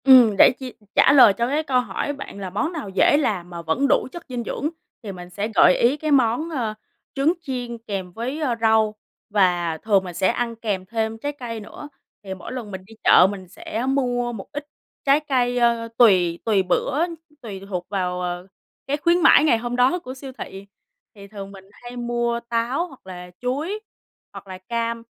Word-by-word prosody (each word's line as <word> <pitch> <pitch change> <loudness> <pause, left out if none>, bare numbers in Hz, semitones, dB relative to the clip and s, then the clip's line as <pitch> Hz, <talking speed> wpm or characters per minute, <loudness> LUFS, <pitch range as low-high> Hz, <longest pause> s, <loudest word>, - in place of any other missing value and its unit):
Ừm, 250 -6 +7
để - - +8
chi 260 -2 -7 0.2
trả - - +6
lời 250 -7 +8
cho 235 - +1
cái 295 +4 0
câu 260 -4 +2
hỏi 285 +3 -3
bạn 275 -7 -9
là 190 -2 -5
món 250 - -1
nào 300 - -5
dễ 195 +9 +4
làm 200 - -1
mà 170 -1 -7
vẫn 170 - 0
đủ - - +2
chất 345 -1 -9
dinh 245 -2 -3
dưỡng 295 - -3 0.3
thì 205 - -5
mình 180 -1 -10
sẽ 200 +4 -3
gợi 180 - +6
ý 250 +5 +3
cái 310 0 -2
món, 260 +3 +2
ờ, 240 -9 -2 0.4
trứng 285 +4 +3
chiên 250 -5 -5
kèm 200 -5 -5
với, 250 - -4
ơ, 265 -6 0
rau, 220 -1 +3 0.3
và 175 -5 +2
thường 200 +2 +2
mình 180 -2 -7
sẽ 180 +2 +1
ăn 235 +3 -1
kèm 205 -5 -3
thêm 220 +2 -2
trái 285 +6 -3
cây 240 -5 -6
nữa. 220 +7 -10 0.3
Thì 190 -1 -5
mỗi 190 +4 -9
lần 240 -5 -6
mình 190 -1 -6
đi 220 - -15
chợ 180 - +7
mình 190 -2 -8
sẽ 220 +5 -5
mua 245 -3 0
một 200 -4 -8
ít 290 0 -6 0.4
trái 280 +1 +5
cây, 250 -5 0
ờ, 235 -1 +2
tùy 180 -7 +4
tùy 205 -4 +3
bữa, 285 - +1 0.4
tùy 200 -5 -7
thuộc 180 -2 -3
vào, 180 -2 -2
ờ, 175 +1 -4 0.4
cái 285 +1 0
khuyến 340 +3 +3
mãi 300 - +7
ngày 295 -7 +4
hôm 240 +1 -4
đó 255 +8 +3
của 255 -6 -8
siêu 265 0 -9
thị. 195 +1 -8 0.5
Thì 200 -1 -12
thường 200 -1 -9
mình 195 -1 -13
hay 240 +3 -11
mua 240 0 -1
táo, 240 +9 0
hoặc 265 - -17
là 180 -1 -9
chuối, 295 +12 -2 0.5
hoặc - - -10
là 185 -1 -7
cam. 230 +3 -3
230 Hz, 205 wpm, -22 LUFS, 195-265 Hz, 0.5 s, để